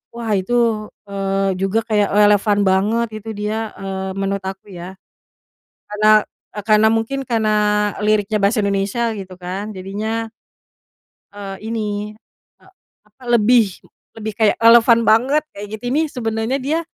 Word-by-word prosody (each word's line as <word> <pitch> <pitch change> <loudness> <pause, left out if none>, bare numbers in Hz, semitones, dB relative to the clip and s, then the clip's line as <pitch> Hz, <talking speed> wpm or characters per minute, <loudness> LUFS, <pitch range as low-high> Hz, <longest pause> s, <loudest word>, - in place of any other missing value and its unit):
wah 230 -2 -4
itu, 190 +6 -4 0.5
eee, 195 -1 -1
juga 195 +3 +1
kayak 210 -2 +2
relevan 205 0 +4
banget 215 +5 +1
itu 225 - -9
dia, 210 +1 -2 0.2
eee, 190 -1 -5
menurut 195 0 -1
aku 190 0 -7
ya. 180 +2 -9 0.9
Karena, 210 +1 0 0.6
karena 215 0 +5
mungkin 230 +5 -2
karena 220 -2 +1 0.6
liriknya 215 0 +1
bahasa 205 +2 +2
Indonesia 200 +3 -1 0.2
gitu 185 -1 -9
kan, 185 +3 -4
jadinya 220 +4 -4 1.0
eee, 195 -1 -7
ini, 210 -2 -3 0.5
e - - -23 0.4
apa 215 +5 -23
lebih 235 -2 +4 0.5
lebih 220 -1 -5
kayak 215 -1 +2
relevan 230 0 +6
banget 255 +8 +3
kayak 205 +1 -8
gitu, 230 - -27
nih 315 +2 +2
sebenarnya 225 +1 -2
dia 285 +5 -1
210 Hz, 130 wpm, -19 LUFS, 195-225 Hz, 1.0 s, relevan